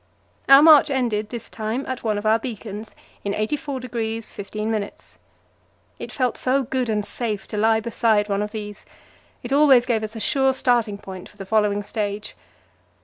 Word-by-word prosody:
Our 275 +2 +9
march 305 -2 +7
ended 230 -6 -1
this 235 -1 -7
time 225 +5 -4
at 260 -1 -5
one 215 -2 0
of 205 - -5
our 220 +1 +4
beacons, 220 -2 -7 0.3
in 200 - -2
84° 245 -2 -3 0.2
15'. 210 +1 -3 1.1
It - - -7
felt 255 -4 -1
so 265 +2 +1
good 255 -1 -2
and 210 -1 0
safe 215 -4 -4
to 210 - -4
lie 220 +1 +3
beside 220 -2 +1
one 200 -1 -1
of 210 0 -3
these; 210 -2 -7 0.6
it 245 +2 -3
always 275 -4 +6
gave 235 -3 0
us 215 +1 -6
a - - -5
sure 265 +3 +2
starting 240 -5 +1
point 190 -2 -10
for 210 - -22
the 195 - -7
following 205 0 +1
stage. 210 0 -4
220 Hz, 170 wpm, -22 LUFS, 210-255 Hz, 1.1 s, Our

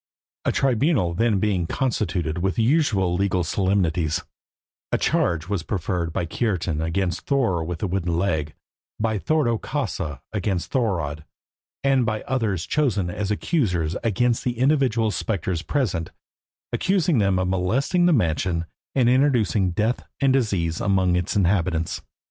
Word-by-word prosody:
A - - +3
tribunal 130 - +2
being 110 +2 +2
then 95 -5 0
constituted 90 - -1
with 95 +1 0
the 115 - +1
usual 115 - +2
legal 95 -1 +1
solemnities, 90 -4 0 0.7
a - - +2
charge 85 -1 +1
was 100 -3 -1
preferred 90 -1 -2
by 85 - -1
Kiartan 85 -5 -1
against 90 +2 -2
Thorer 115 - +1
with 85 +1 -4
the - - 0
wooden 85 -2 -1
leg, 80 -5 -1 0.4
by 110 -1 0
Thordo 120 -4 +1
Kausa 95 - -3
against 95 -3 -2
Thorodd, 85 - -1 0.6
and 135 -2 +3
by 110 -2 -2
others 110 -10 -1
chosen 105 -12 0
as 100 +2 -3
accusers 100 - 0
against 115 +2 +1
the 120 -2 -2
individual 125 -5 +2
spectres 95 -3 -2
present, 95 - -1 0.6
accusing 180 - +2
them 100 -2 +2
of 95 0 0
molesting 120 - +1
the - - +4
mansion, 85 - +1 0.3
and 130 -3 +3
introducing 120 - +3
death 110 +7 0 0.2
and 135 -2 +3
disease 95 -11 0
among 95 -3 +2
its 90 -1 -1
inhabitants. 85 -4 +1
100 Hz, 140 wpm, -23 LUFS, 85-120 Hz, 0.7 s, the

